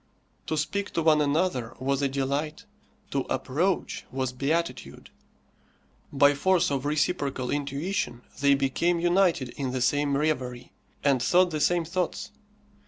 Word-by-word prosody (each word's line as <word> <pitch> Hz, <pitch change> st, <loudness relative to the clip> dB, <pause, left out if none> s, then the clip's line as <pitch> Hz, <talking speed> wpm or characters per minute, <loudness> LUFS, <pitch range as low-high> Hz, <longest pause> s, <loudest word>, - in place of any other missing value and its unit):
To 155 Hz, -, -1 dB
speak 200 Hz, +7 st, -2 dB
to 165 Hz, -, 0 dB
one 155 Hz, -1 st, +5 dB
another 145 Hz, -6 st, 0 dB
was 135 Hz, +1 st, -1 dB
a 140 Hz, -, +1 dB
delight, 140 Hz, +3 st, -2 dB, 0.5 s
to -, -, 0 dB
approach 175 Hz, +8 st, -1 dB
was 130 Hz, -1 st, -2 dB
beatitude; 155 Hz, +6 st, -3 dB, 1.0 s
by 145 Hz, +1 st, +5 dB
force 180 Hz, +3 st, +2 dB
of 135 Hz, -1 st, -1 dB
reciprocal 145 Hz, -4 st, -1 dB
intuition 145 Hz, -2 st, -2 dB, 0.2 s
they 140 Hz, 0 st, +4 dB
became 155 Hz, +6 st, +1 dB
united 175 Hz, -6 st, +2 dB
in 130 Hz, +1 st, -4 dB
the 130 Hz, -, -1 dB
same 140 Hz, +2 st, +2 dB
reverie, 130 Hz, -5 st, -2 dB, 0.3 s
and 140 Hz, -3 st, +3 dB
thought 180 Hz, +6 st, +4 dB
the 155 Hz, -, -2 dB
same 175 Hz, +1 st, +2 dB
thoughts. 180 Hz, +1 st, -3 dB
145 Hz, 135 wpm, -27 LUFS, 135-170 Hz, 1.0 s, one